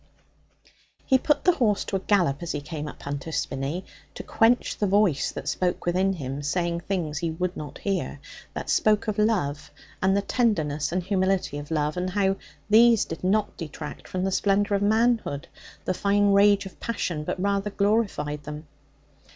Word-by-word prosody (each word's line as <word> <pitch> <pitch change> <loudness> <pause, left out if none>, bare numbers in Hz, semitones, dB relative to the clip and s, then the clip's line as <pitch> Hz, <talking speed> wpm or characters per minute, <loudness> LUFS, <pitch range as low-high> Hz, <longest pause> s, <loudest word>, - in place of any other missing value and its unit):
He 260 - +4
put 290 +2 +1
the 360 - +6
horse 225 - +1
to - - -4
a - - +1
gallop 180 -8 +1
as 170 - -3
he 145 - -2
came 150 0 -6
up - - -10
Hunter's 145 +3 -4
Spinney, 135 +7 -3 0.3
to - - -6
quench 230 +2 +2
the 205 - +2
voice 190 -8 +2
that - - -7
spoke 180 -1 -1
within 185 +2 +2
him, 140 -4 -5
saying 170 +3 -1
things 170 -5 -2
he 170 - -1
would 180 +3 -2
not 150 -2 -7
hear, 190 -7 -2 0.4
that - - -3
spoke 215 +1 +3
of 215 -1 -1
love, 180 -10 0 0.3
and 190 +1 +3
the 200 - 0
tenderness 155 - 0
and 180 +1 -1
humility 190 -5 0
of 145 - -9
love, 150 +1 -1
and 180 +1 -1
of 185 - -9
how 195 -1 +2 0.3
these 230 +1 +6
did 165 - -7
not 205 +3 +1
detract 160 -4 -7
from 185 0 -3
the 190 - 0
splendour 200 +1 +2
of 200 - 0
manhood, 220 - +1 0.4
the 185 - +1
fine 200 +1 +2
rage 200 0 +5
of 195 - -11
passion, 175 -9 -2
but 165 - -3
rather 200 +1 0
glorified 200 -8 0
them. 150 +1 -7
190 Hz, 185 wpm, -25 LUFS, 155-205 Hz, 0.4 s, the